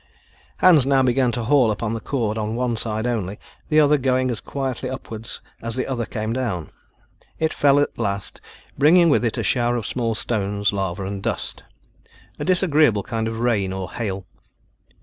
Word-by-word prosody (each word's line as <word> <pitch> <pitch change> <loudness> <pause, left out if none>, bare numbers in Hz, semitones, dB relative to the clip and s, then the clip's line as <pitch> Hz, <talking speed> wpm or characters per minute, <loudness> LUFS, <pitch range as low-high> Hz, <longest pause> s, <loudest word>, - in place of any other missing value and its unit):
Hans 170 -7 +6
now 135 -1 +4
began 125 0 +2
to 120 0 -2
haul 130 0 +4
upon 110 +1 -2
the 115 - -3
cord 115 -4 -2
on 110 0 -2
one 125 -1 0
side 110 0 -2
only, 105 -5 -2 0.3
the 155 -1 +4
other 150 -1 +4
going 130 -1 +1
as 115 - -4
quietly 135 -3 -3
upward 115 -3 -7 0.3
as 115 0 -4
the 130 - -1
other 120 -4 -3
came 110 -1 -3
down. 115 -10 -3 0.7
It 160 0 0
fell 145 0 +4
at 145 - -1
last, 100 0 -3 0.4
bringing 170 +4 +6
with 140 - +3
it 115 - -1
a - - -1
shower 120 -1 +1
of 115 -3 -3
small 115 -3 -1
stones, 100 -2 -1
lava 95 -1 -2
and 100 0 -4
dust, - - -3 0.8
a - - -2
disagreeable 155 - +3
kind 110 +1 -2
of 115 0 -4
rain 105 -6 +1
or 95 -1 -5
hail. 100 -5 -4
115 Hz, 180 wpm, -22 LUFS, 105-135 Hz, 0.8 s, Hans